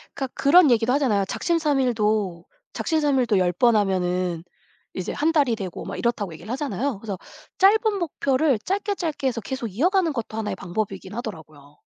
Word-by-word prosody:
그러니까 265 -2 -4
그런 295 0 +6
얘기도 230 +1 +3
하잖아요. 220 -9 +2
작심삼일도 220 - 0 0.3
작심삼일도 270 - +1
10 180 -1 +2
번 235 +4 +3
하면은 180 -4 0 0.5
이제 185 -1 -4
1 315 +2 +1
달이 280 -8 +2
되고 190 -5 -6
막 - - -5
이렇다고 210 -7 -1
얘기를 185 +8 -9
하잖아요. 270 -4 -2
그래서 205 -4 -5 0.4
짧은 420 +2 +4
목표를 280 -5 +1
짧게, 400 - -2
짧게 310 -7 -2
해서 235 -2 -1
계속 255 +1 -4
이어가는 335 - +1
것도 225 -3 -5
하나의 215 -2 -2
방법이긴 195 +1 -4
하더라고요. 155 - -8
235 Hz, 400 characters per minute, -24 LUFS, 195-290 Hz, 0.5 s, 그런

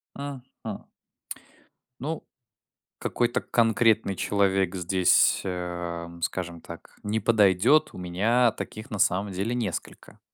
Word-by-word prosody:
Мгм. 130 -6 -8 1.2
Ну, 155 +5 -4 0.7
какой-то 120 0 0
конкретный 110 -3 +2
человек 95 -2 +1
здесь, 90 0 +3
ам, 85 -2 -5
скажем 85 0 -3
так, 85 - -12
не 105 +2 -1
подойдет. 110 +6 +4
У - - -10
меня 105 +7 +2
таких 110 +1 -8
на 105 - -4
самом 95 +3 +2
деле 100 +6 -2
несколько. 110 -7 -5
100 Hz, 105 wpm, -26 LUFS, 90-115 Hz, 1.2 s, подойдет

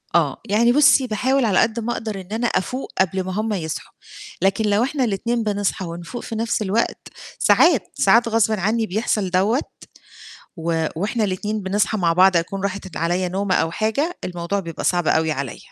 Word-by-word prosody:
آه، - - +1
يعني 235 +4 +4
بُصّي، 275 -1 +5
باحاول 255 +4 +1
على 200 -4 +3
قد 225 +1 +1
ما 240 +2 -2
أقدر 215 -4 -5
إن 180 - -14
أنا 230 +2 0
أفوق 255 +5 -2
قبل 190 0 +1
ما 185 - -4
هُم 215 +2 -1
يصحوا، 160 -5 -5 0.5
لكن 195 +4 +1
لو 205 +3 +3
إحنا 270 +1 -1
الاتنين 230 +2 -1
بنصحى 205 -2 -1
ونفوق 170 +8 -7
في 225 - -6
نَفْس 230 0 -1
الوقت 210 +3 -1 0.3
ساعات، 320 - +4
ساعات 230 +5 +4
غصبٍ 220 -2 +1
عنّي 220 +4 +1
بيحصل 210 -1 -1
دَوّة، 195 +8 +2 1.0
و 165 -1 -1
وإحنا 215 +6 -1
الاتنين 205 +2 -2
بنصحى 205 +2 0
مع 170 -2 +2
بعض 185 +1 +5
أكون 185 +3 -1
راحت 200 -1 -3
د 165 - -14
عليَّ 175 +3 0
نومة 190 0 -1
أو 165 0 +1
حاجة، 250 - -1
الموضوع 175 +3 -3
بيبقى 165 -3 -7
صعب 175 -3 +1
أوي 160 0 +2
عليَّ. 140 -4 -5
200 Hz, 185 wpm, -21 LUFS, 180-225 Hz, 1.0 s, بُصّي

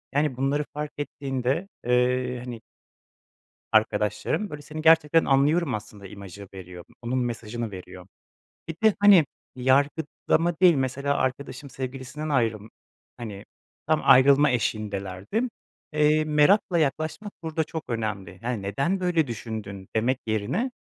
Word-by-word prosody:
yani, 145 -4 +1
bunları 140 +3 +1
fark 150 0 -4
ettiğinde, 140 +3 -2 0.2
eee, 125 0 +1
hani 120 -2 -7 1.1
arkadaşlarım, 110 - +1
böyle, 150 -1 -7
"Seni 155 +1 -7
gerçekten 160 0 +5
anlıyorum." 140 +1 +2
aslında 105 -1 -8
imajı 100 0 -10
veriyor. 90 -2 -10 0.2
Onun 125 +2 -1
mesajını 120 -2 -3
veriyor. 90 -1 -10 0.6
Bir 165 - -4
de, 220 - +6
hani, 200 -7 +7 0.3
yargılama 145 +5 +1
değil, 180 -3 +7
mesela 140 +1 0
arkadaşım 140 +1 -3
sevgilisinden 130 +3 -6
ayrılm 115 -6 0 0.5
hani, 105 -4 -7 0.4
tam 155 -1 +2
ayrılma 140 +2 +6
eşiğindelerdi 100 - -2
m 255 - -1 0.4
eee, 150 +1 +3
merakla 155 +5 +3
yaklaşmak 155 +7 -1
burada 160 0 -1
çok 160 -1 -6
önemli. 105 -6 -4
Yani, 120 -4 -2
"Neden 140 - -1
böyle 175 -4 +2
düşündün?" 105 -4 -6
demek 125 +4 +1
yerine, 110 - -1
130 Hz, 125 wpm, -25 LUFS, 110-155 Hz, 1.1 s, hani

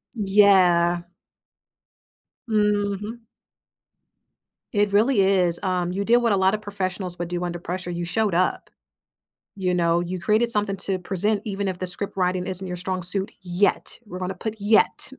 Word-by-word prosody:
Yeah. 190 -4 +4 1.5
Mhm. 210 +1 0 1.5
It 205 -1 +1
really 220 +1 +4
is, 185 -3 +2
um 180 -1 -1
you 200 +2 -2
did 235 +1 +5
what 235 -2 +1
a 200 - +3
lotta 190 +3 +2
professionals 185 -3 -4
would 175 - -3
do 175 0 -3
under 175 -1 -4
pressure, 180 +1 -5
you 170 0 -3
showed 210 +1 0
up. 185 +1 0 0.9
You 185 -2 -1
know? 170 -1 +2
You 180 +1 -4
created 220 +6 +1
something 205 -2 0
to 190 -1 -2
present 200 +4 +1
even 200 -1 -3
if 180 - -4
the 185 - -4
script 195 +2 -3
writing 180 0 0
isn't 185 0 -3
your 180 - -4
strong 185 0 -3
suit 195 +4 -1
yet, 180 +2 0
we're 180 -2 -8
gonna 185 +1 -4
put 220 +4 -5
yet. 215 +5 +2
190 Hz, 160 wpm, -23 LUFS, 180-205 Hz, 1.5 s, did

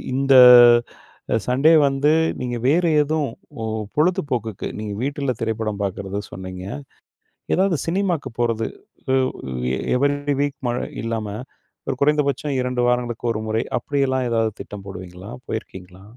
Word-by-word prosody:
இந்த 135 +1 +2 1.1
சண்டே 135 +6 +4
வந்து 140 +2 +2 0.3
நீங்க 120 -1 -3
வேறு 170 +4 +3
எதும் 150 0 0 0.3
பொ 115 - -5 0.3
பொழுதுபோக்குக்கு 135 - -1
நீங்க 105 -1 -4
வீட்ல 140 0 -1
திரைப்படம் 110 -2 -2
பார்க்கிறதா 100 +1 -3
சொன்னீங்க, 95 0 -7 0.9
ஏதாவது 185 -2 +2
சினிமாவுக்கு 175 -4 -1
போறது, 115 -2 0 0.4
உ - - +3 0.6
எ - - -3 0.2
எவரி 140 +2 +2
டே 145 - +2
வீக் 145 -1 -3
மழை 120 +1 -2 0.2
இல்லாம 115 -2 -3 0.6
ஒரு 135 - -1
குறைந்தபட்சம் 145 -1 +1
2 125 -1 -1
வாரங்களுக்கு 120 -1 -1
1 110 - -3
முறை 110 +1 0 0.2
அப்படியெல்லாம் 130 -1 0
ஏதாவது 115 -1 +1
திட்டம் 100 -2 -9
போடுவீங்களா? 95 +1 -9 0.2
போயிருக்கீங்களா? 95 -4 -7
125 Hz, 125 wpm, -21 LUFS, 110-145 Hz, 1.1 s, சண்டே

